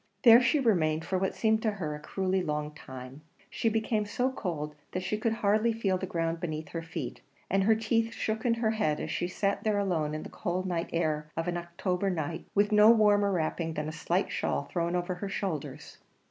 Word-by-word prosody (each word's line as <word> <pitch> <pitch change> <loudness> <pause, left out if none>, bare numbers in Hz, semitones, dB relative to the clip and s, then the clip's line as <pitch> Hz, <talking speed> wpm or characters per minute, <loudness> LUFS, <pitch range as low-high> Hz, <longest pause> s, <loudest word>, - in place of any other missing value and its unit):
There 235 -1 +9
she 290 +5 +3
remained 160 - +2
for 185 - 0
what 190 - -1
seemed 220 -1 +2
to 220 -2 0
her 160 -7 -3
a 150 - -6
cruelly 190 +4 -1
long 150 -2 -2
time; 130 -1 -10 0.3
she 225 - +1
became 220 -1 0
so 250 +5 0
cold 160 - -4 0.2
that 185 - -2
she 200 - -1
could 220 +2 0
hardly 215 +3 +3
feel 195 -5 0
the 190 - -4
ground 165 -1 -1
beneath 155 -3 -4
her 165 - -4
feet; 165 -5 -6 0.3
and 195 0 +3
her 220 +1 +5
teeth 225 +1 +1
shook 220 -1 -2
in 235 -2 +2
her 230 -2 +1
head 155 -9 0
as - - -4
she 175 - -1
sat 195 +2 -1
there 215 -2 +1
alone 165 -7 0
in 155 - -4
the - - -8
cold 185 +1 -3
night 175 -2 -2
air 155 -2 0
of 165 +1 -1
an 175 - -1
October 180 +2 -2
night, 160 -3 -3
with 205 +1 +3
no 210 +1 +7
warmer 205 -3 +5
wrapping 165 -2 -1
than 150 0 -2
a - - -3
slight 170 +4 -1
shawl - - -1
thrown 170 +3 -2
over 180 +1 -1
her 195 +3 -5
shoulders. 150 -8 -4
185 Hz, 215 wpm, -29 LUFS, 160-215 Hz, 0.3 s, There